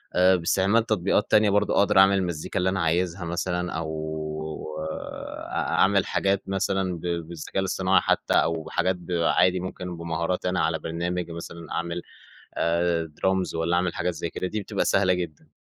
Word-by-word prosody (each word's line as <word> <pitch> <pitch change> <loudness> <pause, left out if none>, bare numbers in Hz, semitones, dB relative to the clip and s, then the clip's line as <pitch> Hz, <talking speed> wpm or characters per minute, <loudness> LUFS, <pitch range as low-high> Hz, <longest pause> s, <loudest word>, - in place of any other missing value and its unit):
أ 95 +1 +6
باستعمال 95 +6 +2
تطبيقات 105 -1 +1
تانية 105 -1 +5
برضه، 105 +1 +2
أقدر 100 0 +3
أعمل 95 0 +6
المزيكا 85 -5 -2
اللي 90 +1 +2
أنا 95 0 -1
عايزها 85 +2 0
مثلًا 90 +1 -2
أو 80 0 -3 1.6
أ - - -6
أعمل 100 0 +2
حاجات 100 0 0
مثلًا 95 -1 0
ب - - -14
بالذكاء 85 0 -3
الاصطناعي 95 0 +2
حتّى - - +1
أو 80 -1 +2
بحاجات 95 +3 0
ب 90 0 -11
عادي 90 +2 +3
ممكن 90 -1 -6
بمهاراتي 85 +2 -2
أنا 90 - 0
على 80 0 +1
برنامج 85 +2 -3
مثلًا 85 0 -8
أعمل 85 +1 -2 0.5
آآ 85 0 +1 0.2
درامز 95 -2 +1
والّا 80 +1 +1
أعمل 90 -1 +1
حاجات 90 - -1
زي 85 +1 -4
كده 95 - -3
دي 105 +3 -3
بتبقى - - -2
سهلة 95 -2 +3
جدًا. 85 -4 -5
90 Hz, 165 wpm, -25 LUFS, 85-95 Hz, 1.6 s, أ